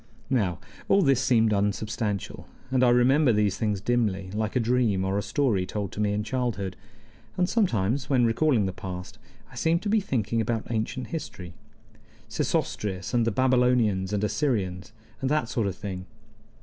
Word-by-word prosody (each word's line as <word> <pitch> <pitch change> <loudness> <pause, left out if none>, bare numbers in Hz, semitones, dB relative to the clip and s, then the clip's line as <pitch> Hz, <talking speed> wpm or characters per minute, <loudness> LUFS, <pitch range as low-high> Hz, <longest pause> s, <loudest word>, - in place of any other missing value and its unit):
Now, 100 -10 +1 0.3
all 195 0 +4
this 135 -4 +3
seemed 115 -4 +3
unsubstantial, 105 0 -2 0.2
and 130 -1 +3
I 125 - +6
remembered 125 +1 +4
these 105 -2 +2
things 105 -3 0
dimly, 100 -4 0
like 110 +2 -2
a - - +3
dream 115 -5 +1
or 95 +1 -1
a 100 - +1
story 105 -1 +1
told 100 -1 -4
to - - -8
me 105 -1 +1
in 105 +1 -1
childhood; 110 -5 -2 0.6
and 180 -1 +2
sometimes, 130 - 0
when 125 -4 +4
recalling 115 -1 +2
the 95 - -2
past, 95 +4 -7 0.3
I - - -13
seemed 165 +6 +1
to 210 - -1
be 220 +1 +4
thinking 115 - -1
about 110 0 -2
ancient 115 +3 -2
history 90 - -6 0.7
Sesostris, 95 -3 -2
and 120 -1 +2
the - - +2
Babylonians 125 -6 +2
and 105 0 -1
Assyrians, 100 - -1 0.3
and 135 - 0
that 150 -5 +1
sort 115 -4 0
of 95 - -3
thing. 95 -3 -6
110 Hz, 170 wpm, -26 LUFS, 100-125 Hz, 0.7 s, I